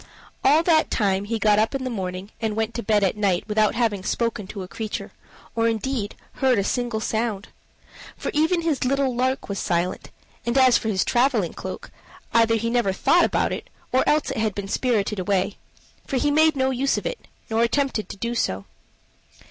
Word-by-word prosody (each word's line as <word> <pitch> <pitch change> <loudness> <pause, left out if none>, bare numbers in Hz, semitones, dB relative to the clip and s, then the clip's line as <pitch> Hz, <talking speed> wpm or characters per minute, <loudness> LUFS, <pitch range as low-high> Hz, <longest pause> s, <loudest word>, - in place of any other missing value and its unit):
All 305 +4 +5
that 325 -2 +3
time 195 -2 +1
he 225 +2 -1
got 210 -1 +3
up 220 +5 +1
in 270 - -2
the 255 - -3
morning 190 -1 -5
and 220 -2 -1
went 220 +1 -1
to 235 - -3
bed 210 -2 +2
at 195 - +2
night 200 -3 0
without 215 0 +2
having 220 -5 0
spoken 230 -2 -1
to 195 -1 -6
a - - -8
creature, 215 +4 -5 0.4
or, 230 0 +2
indeed, 225 -1 -2 0.3
heard 260 -3 +4
a 200 - +2
single 240 +1 -1
sound. 220 -2 -2 0.7
For - - -3
even 325 +3 +2
his 315 -5 0
little 265 0 +1
lark 260 +2 0
was 200 -1 -3
silent; 175 0 -1 0.3
and 235 +2 0
as 260 -2 +6
for 225 - +1
his 200 -4 +1
traveling 240 -7 +2
cloak, - - -7 0.4
either 230 0 +4
he 230 +1 -1
never 240 -5 +2
thought 340 - +4
about - - 0
it, - - -6 0.2
or 260 - +3
else 300 0 +2
it - - -4
had 220 -2 0
been 200 -1 -4
spirited 210 -2 0
away 195 +1 0 0.5
for 270 - -1
he 290 +3 +2
made 310 +1 +4
no 265 -1 +1
use 265 +2 +1
of - - -4
it, - - -5 0.2
nor 225 +1 +2
attempted 235 -1 0
to - - -7
do 235 +4 -2
so. 95 - -1
230 Hz, 200 wpm, -23 LUFS, 205-260 Hz, 0.7 s, as